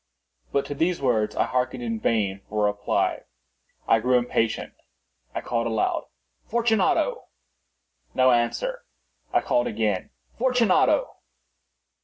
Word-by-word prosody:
But 140 - +1
to - - -4
these 170 +4 0
words 110 -5 +1
I - - +2
hearkened 125 - -1
in 230 -1 -2
vain 100 - 0
for 105 0 +1
a 105 - +3
reply. 105 - -1 0.7
I 115 - +5
grew 125 +3 +3
impatient. 120 -2 -1 0.6
I - - -2
called 115 -1 -1
aloud— 110 -2 0 0.4
"Fortunato!" 235 - +1 0.9
No 130 0 +5
answer. 125 - 0 0.5
I - - +3
called 120 0 +1
again— 105 -3 -1 0.3
"Fortunato!" 250 - +2
125 Hz, 120 wpm, -25 LUFS, -, 0.9 s, I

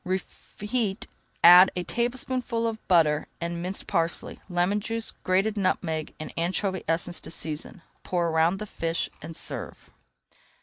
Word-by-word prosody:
Reheat, 200 +3 -3 0.4
add 180 +2 +10
a 180 - -1
tablespoonful 240 +1 -1
of 225 -1 -4
butter, 155 -4 +4
and 170 0 -3
minced 185 +2 -4
parsley, 165 -2 -1
lemon 180 +3 +1
juice, 225 +2 -3
grated 195 +4 +1
nutmeg, 160 -5 -1
and 155 - -7
anchovy 185 +2 -1
essence 170 +2 -1
to - - -8
season. 160 +2 -5 0.2
Pour 175 -2 0
around 165 +3 +3
the 215 - -5
fish 165 -4 -2
and 160 +2 -8
serve. - - -5
180 Hz, 135 wpm, -27 LUFS, 165-210 Hz, 0.4 s, add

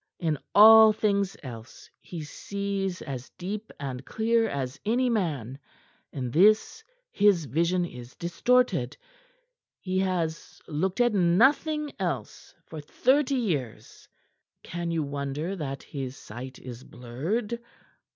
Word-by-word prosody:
"In 160 -5 -1 0.2
all 220 +1 +9
things 200 -2 0
else 115 -3 -10
he 170 -3 -8
sees 195 +3 -4
as 130 -2 -6
deep 205 +4 -5
and 135 -2 -5
clear 225 - +1
as 135 -2 -4
any 245 +3 +1
man; 145 - -2 0.5
in 125 -4 -4
this 215 - +3 0.3
his 200 - +3
vision 170 +7 +1
is 125 -6 -10
distorted. 245 +9 +1 0.8
He 185 0 -2
has 175 -4 -2
looked 180 +8 -1
at 240 -2 +3
nothing 270 - +3
else - - -4
for 160 -2 -8
thirty 270 - +2
years; 155 - -3 0.6
can 175 0 -4
you 165 -2 0
wonder 140 +5 -3
that 140 -6 -5
his 135 -2 -6
sight 125 +4 -9
is 125 -1 -9
blurred?" 185 - -4
175 Hz, 120 wpm, -27 LUFS, 140-215 Hz, 0.8 s, all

